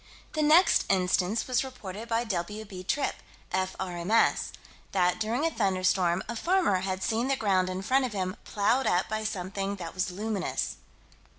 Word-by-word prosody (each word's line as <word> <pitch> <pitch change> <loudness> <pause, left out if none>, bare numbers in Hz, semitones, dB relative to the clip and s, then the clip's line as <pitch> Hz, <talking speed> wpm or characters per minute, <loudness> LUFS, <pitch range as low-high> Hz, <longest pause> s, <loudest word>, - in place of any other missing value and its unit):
The 310 - 0
next 320 +4 +5
instance 185 +2 +2
was 255 0 +1
reported 230 -4 -8
by 230 +1 +1
W.B. 200 -1 -4
Tripp, 285 +8 0 0.3
F.R.M.S. 185 +2 +1 0.4
that, 180 -1 +2
during 230 +7 0
a 330 - +1
thunderstorm, 185 - +1
a 235 - -4
farmer 345 - +2
had 185 0 -3
seen 230 +3 0
the 275 - +2
ground 190 -6 +1
in 185 +1 -4
front 260 +5 +3
of 240 - -4
him 185 -1 -2
plowed 225 +6 +1
up 180 +1 +2
by 215 0 -2
something 195 -1 -3
that 170 -4 -7
was 185 0 -1
luminous. 205 +2 -2
200 Hz, 160 wpm, -28 LUFS, 185-230 Hz, 0.4 s, next